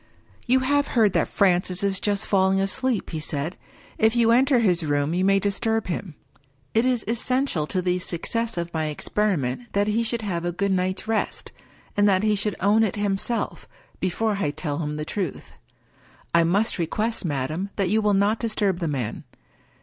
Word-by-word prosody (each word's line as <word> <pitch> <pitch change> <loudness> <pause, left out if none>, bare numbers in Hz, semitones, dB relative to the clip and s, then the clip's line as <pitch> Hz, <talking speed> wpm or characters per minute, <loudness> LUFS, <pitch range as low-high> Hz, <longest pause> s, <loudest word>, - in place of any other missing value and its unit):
" - - -29
You 260 +2 +4
have 285 +2 +2
heard 215 -4 +4
that - - +2
Francis 185 -1 +1
is 195 -1 +1
just 205 -1 0
falling 190 -1 +2
asleep," 215 +4 -1
he 160 - -3
said. 150 +2 -3 0.2
" - - -24
If 220 +1 +3
you 230 -1 +4
enter 260 +2 +4
his 180 -7 +2
room 145 0 0
you 180 +1 +1
may 195 +1 +4
disturb 215 +3 0
him. 180 -2 -4 0.6
It 225 +2 +3
is 250 -3 +1
essential 235 - 0
to 185 +2 -1
the 180 0 +1
success 225 +6 -2
of 170 0 -3
my 160 -1 -1
experiment 175 - -1
that 200 0 +2
he 215 +2 +1
should 230 0 -2
have 175 -5 -2
a 175 - -1
good 200 +3 -1
night's 185 +2 -1
rest, 220 -1 -2 0.4
and 205 0 +4
that 190 0 +2
he 215 -1 +3
should 205 0 -1
own 205 +3 +3
it 220 -3 +1
himself, 205 +3 -2 0.3
before 205 +3 0
I 150 - +1
tell 145 0 -3
him 150 -2 -3
the 150 0 -4
truth. 185 -3 -4 0.8
I 170 0 +5
must 200 +5 +1
request, 215 +8 -1
madam, 155 +4 -2
that 195 -3 0
you 220 +1 +3
will 210 -1 +2
not 205 +3 +2
disturb 210 -5 0
the 170 - -1
man. 130 -7 -3
195 Hz, 190 wpm, -24 LUFS, 175-220 Hz, 0.8 s, I